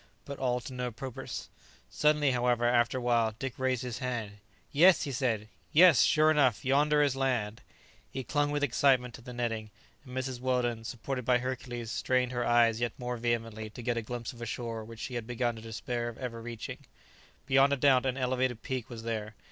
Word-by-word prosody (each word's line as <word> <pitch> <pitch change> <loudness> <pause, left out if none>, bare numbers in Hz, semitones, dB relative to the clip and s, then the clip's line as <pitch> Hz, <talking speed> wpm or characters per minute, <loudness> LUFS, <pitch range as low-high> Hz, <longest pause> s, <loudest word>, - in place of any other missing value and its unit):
But 140 -1 -7
all 125 -2 +1
to 130 - -8
no 125 -1 -2
purpose. 130 +2 -6 0.4
Suddenly, 150 -2 +3
however, 120 -1 +1
after 120 +1 +3
a - - -3
while, 115 -3 +2
Dick 135 0 -5
raised 130 -2 0
his 125 -2 -4
hand. 115 -5 -4 0.3
"Yes!" 175 +4 +6
he 140 - -3
said; 120 -5 -1 0.2
"yes; 170 -3 +7
sure 155 0 +5
enough, 135 -8 +2
yonder 150 +2 +4
is 140 -2 +1
land." 120 -6 -1 0.5
He 135 - -5
clung 145 +2 0
with 145 0 -1
excitement 125 -2 +3
to 125 - -10
the 125 +1 -9
netting; 115 -3 -3 0.3
and 130 -2 -8
Mrs 130 -1 -3
Weldon, 120 -3 0
supported 125 +2 -4
by 125 +1 +4
Hercules, 120 -2 -4
strained 125 +1 +1
her 120 -1 -1
eyes 120 -1 +3
yet 120 -2 -2
more 125 0 -3
vehemently 115 -2 -2
to 115 +3 -10
get 120 0 0
a 115 - -1
glimpse 120 +1 -5
of 120 - -13
a 115 - -4
shore 115 -1 -4
which 115 0 -10
she 130 - -5
had 120 -2 -4
begun 120 -1 -1
to - - -9
despair 120 +1 -3
of 115 - -10
ever 115 -3 -5
reaching. 115 -1 -6 0.7
Beyond 135 +1 +4
a - - +1
doubt 135 -1 +4
an 130 0 -1
elevated 130 -2 -1
peak 130 -3 -4
was 115 -2 -8
there. 110 -2 -4
125 Hz, 205 wpm, -30 LUFS, 115-130 Hz, 0.7 s, yes